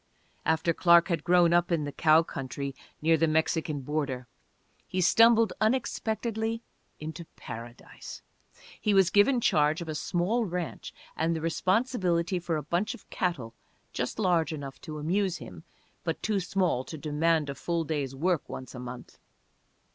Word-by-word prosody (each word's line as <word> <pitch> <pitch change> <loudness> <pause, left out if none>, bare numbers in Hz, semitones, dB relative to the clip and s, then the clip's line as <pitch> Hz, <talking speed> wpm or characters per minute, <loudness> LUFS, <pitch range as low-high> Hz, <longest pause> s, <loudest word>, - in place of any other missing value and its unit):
After 160 +1 +2
Clark 170 0 +5
had 165 -4 -1
grown 175 -1 +4
up, 175 +1 +3
in 165 -3 +1
the 145 - -4
cow 155 +2 +4
country 140 -2 -5 0.3
near 165 +1 +4
the 165 +1 +2
Mexican 160 -1 0
border, 135 -3 -2 0.6
he 185 - -2
stumbled 230 +3 +5
unexpectedly 225 -1 -1 0.4
into 160 +2 -7
paradise. 115 +1 -9 0.6
He 210 -2 +2
was 190 -2 +5
given 240 +6 +4
charge 150 -6 +2
of 170 - -6
a 155 - -3
small 180 +9 0
ranch 180 -3 -4 0.2
and 165 +1 0
the - - -2
responsibility 185 0 +1
for 170 -2 -2
a 150 - -4
bunch 185 +6 -1
of - - -18
cattle 135 -11 -2 0.4
just 125 - -3
large 175 -6 +2
enough 140 -3 -7
to 155 -2 -7
amuse 180 +4 0
him, 90 -9 -11 0.4
but - - -3
too 215 -2 +1
small 180 -7 0
to 160 - -7
demand 155 +1 +1
a 140 - -3
full 170 +4 -2
day's 145 -4 -3
work 170 +2 0
once 130 - -7
a 125 - -8
month. 125 0 -9
165 Hz, 155 wpm, -28 LUFS, 150-185 Hz, 0.6 s, Clark